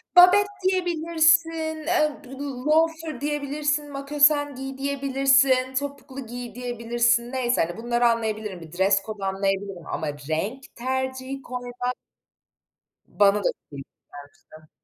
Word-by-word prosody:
Babet 365 +3 +8 0.2
diyebilirsin, 330 -3 +2
ııı, 300 -1 0
b 250 - -14 0.4
loafer 320 -2 +1
diyebilirsin, 295 0 -1
makosen 290 0 +2
giy 270 0 -6
diyebilirsin, 270 -1 +2
topuklu 280 -2 -7
giy 245 -1 -7
diyebilirsin, 240 0 0
neyse, 250 -2 +1
hani, 175 +5 -7
bunları 240 +1 +1
anlayabilirim, 215 -5 -2
bir 160 -1 -11
dress 195 +2 +2
code 210 -3 -6
anlayabilirim 195 -2 -2
ama 155 - -3 0.2
renk 210 +12 -2
tercihi 260 +1 -3
koymak 250 0 -4 1.1
bana 205 0 +3
da - - -6
çok - - -61
komik 140 -2 -9 0.7
gelmişti. 155 0 -16
260 Hz, 115 wpm, -24 LUFS, 230-295 Hz, 1.1 s, Babet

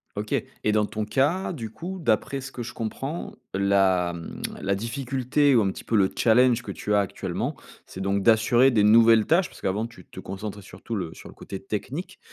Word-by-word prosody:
OK, - - -5 0.3
et 105 - +2
dans 105 0 +2
ton 105 0 -4
cas, 145 - +1
du 115 -7 -6
coup, 185 +9 -6
d'après 135 0 0
ce 135 +1 -8
que 125 - -7
je 115 - -5
comprends 135 +8 -4 0.2
la, 95 -3 +2
mmh, 85 -1 -8 0.2
la 100 0 0
difficulté 130 +5 +1
ou 115 - +5
un 95 - +1
petit - - -9
peu 115 - -1
le 100 -3 +5
challenge 120 +1 +4
que 100 - -7
tu 105 +2 -3
as 105 - +5
actuellement, 100 - -3 0.3
c'est 95 - -9
donc 100 +1 0
d'assurer 120 +4 +5
des 110 -5 +3
nouvelles 115 0 +6
tâches 170 +2 +3
parce - - -15
qu'avant 105 +4 -1
tu 105 -6 -16
te - - -11
concentrais 100 +2 -6
sur 95 -1 -14
tout 115 - -5
le 90 -6 -4
sur - - -12
le - - -12
côté 95 - -8
technique, 125 - -5
110 Hz, 215 wpm, -25 LUFS, 100-130 Hz, 0.3 s, nouvelles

